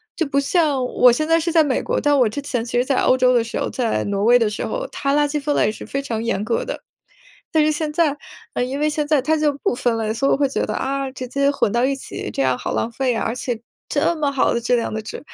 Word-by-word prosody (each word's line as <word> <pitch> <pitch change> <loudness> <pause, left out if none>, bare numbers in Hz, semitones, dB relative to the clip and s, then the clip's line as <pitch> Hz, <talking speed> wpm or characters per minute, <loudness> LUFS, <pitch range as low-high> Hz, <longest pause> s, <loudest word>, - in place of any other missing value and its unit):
就 330 -4 -1
不 280 0 +1
像 280 -3 +1
我 250 0 +5
现 310 +6 0
在 330 0 +4
是 335 +1 -1
在 320 -2 +5
美 270 -4 0
国， - - -1
但 290 0 +2
我 235 -4 +4
之 285 - -5
前 245 -5 -2
其 240 0 -3
实 250 - +2
在 270 - 0
欧 260 - +4
洲 255 0 +4
的 235 -2 +3
时 230 - -4
候， - - -1
在 240 -4 -1
挪 200 0 -1
威 240 +2 +6
的 230 - +2
时 210 - -4
候， - - -3
它 275 +1 -1
垃 295 0 +3
圾 295 0 -2
分 290 0 -1
类 210 - +2
是 - - -9
非 275 0 -3
常 225 -4 -3
严 215 -3 -1
格 230 - 0
的。 - - -6 0.7
但 310 -1 +3
是 310 - +3
现 300 0 -2
在， 310 -3 +2 0.4
呃， 245 - 0
因 265 +3 -3
为 300 - +2
现 300 -1 -2
在 300 -2 +3
它 315 +4 +1
就 300 -1 +2
不 - - +1
分 240 -2 0
类， 220 -1 -1
所 275 +4 0
以 - - +3
我 - - +2
会 280 - +2
觉 - - -1
得， - - -3
啊， 275 0 -2
直 255 -1 -7
接 280 +2 +1
混 220 -7 0
到 240 +1 +1
一 275 0 0
起， 270 - -7
这 135 - -1
样 130 -1 +2
好 - - -4
浪 230 - -1
费 250 -1 0
啊， - - -1
而 225 - -1
且 245 -2 -3 0.3
这 320 +3 +1
么 290 -3 0
好 270 - +2
的 235 - -1
质 240 +1 +2
量 230 -2 -1
的 220 - -3
纸。 215 - -7
270 Hz, 320 characters per minute, -21 LUFS, 235-295 Hz, 0.7 s, 威